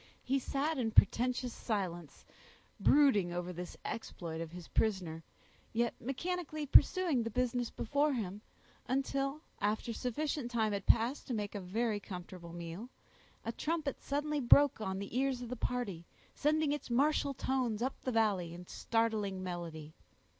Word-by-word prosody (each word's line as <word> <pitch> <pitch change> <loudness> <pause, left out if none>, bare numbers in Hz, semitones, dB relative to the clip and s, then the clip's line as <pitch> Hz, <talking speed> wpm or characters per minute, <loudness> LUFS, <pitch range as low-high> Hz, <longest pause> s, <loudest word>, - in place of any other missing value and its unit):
He 270 +2 +1
sat 280 +3 -1
in 230 -3 +1
portentous 245 +3 +3
silence, 175 - -3 0.5
brooding 260 -12 +5
over 175 +1 -3
the 180 +1 -5 0.2
exploit 165 -7 -5
of 165 -1 -5
his 175 -1 -9
prisoner, 180 -7 0 0.5
yet 235 +1 +1
mechanically 310 +4 -3
pursuing 325 -1 +5
the 230 - -2
business 245 +1 0
before 285 +5 +1
him, 205 -4 -3 0.5
until, 275 +2 0 0.2
after 215 +3 0
sufficient 255 +2 -2
time 220 -3 +1
had 200 -1 -3
passed 235 +5 +3
to 250 - -1
make 205 -2 -3
a 205 - -4
very 210 +4 0
comfortable 180 -3 -8
meal, 170 +7 -6 0.6
a 230 - -1
trumpet 305 +1 -2
suddenly 295 +1 -1
broke 280 0 +6
on 190 -2 -2
the 200 +3 -6
ears 260 -1 +1
of 240 - -6
the 250 - -3
party, 225 -9 -2 0.3
sending 305 0 +2
its 295 -2 -3
martial 280 +2 +2
tones 250 -5 0
up 265 - 0
the 255 - -2
valley, 200 -7 +1
in 180 +1 -9
startling 215 -3 0
melody. 165 -4 -5
230 Hz, 150 wpm, -34 LUFS, 190-275 Hz, 0.6 s, broke